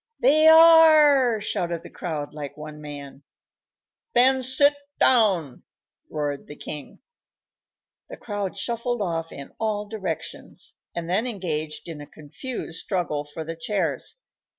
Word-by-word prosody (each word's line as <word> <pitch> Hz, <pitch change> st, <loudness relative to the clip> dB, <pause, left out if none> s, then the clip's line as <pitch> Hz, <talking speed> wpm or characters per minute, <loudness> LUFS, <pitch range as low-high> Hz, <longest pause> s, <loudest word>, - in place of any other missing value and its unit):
"They 310 Hz, +5 st, +5 dB
are!" 310 Hz, -7 st, +7 dB
shouted 175 Hz, -5 st, -3 dB
the -, -, -12 dB
crowd, 150 Hz, -4 st, -5 dB
like 150 Hz, -1 st, -7 dB
one 150 Hz, 0 st, -9 dB
man. 145 Hz, -2 st, -9 dB, 0.9 s
"Then 260 Hz, +2 st, +5 dB
sit 260 Hz, +3 st, +3 dB, 0.3 s
down!" 190 Hz, -, +3 dB, 0.5 s
roared 145 Hz, -2 st, -3 dB
the 150 Hz, -, -9 dB
king. 150 Hz, -1 st, -8 dB, 1.1 s
The -, -, -8 dB
crowd 205 Hz, -3 st, -4 dB
shuffled 235 Hz, +3 st, -2 dB
off 165 Hz, -3 st, -3 dB
in 140 Hz, -, -10 dB
all 215 Hz, -2 st, -1 dB
directions, 190 Hz, -7 st, -6 dB, 0.2 s
and 170 Hz, -1 st, -4 dB
then 200 Hz, +8 st, 0 dB
engaged 160 Hz, -9 st, -4 dB
in 160 Hz, -3 st, -7 dB
a 145 Hz, -, -10 dB
confused 165 Hz, -, -7 dB
struggle 165 Hz, -6 st, -2 dB
for 145 Hz, +2 st, -7 dB
the 165 Hz, +1 st, -6 dB
chairs. 165 Hz, -, -2 dB
180 Hz, 130 wpm, -24 LUFS, 150-240 Hz, 1.1 s, are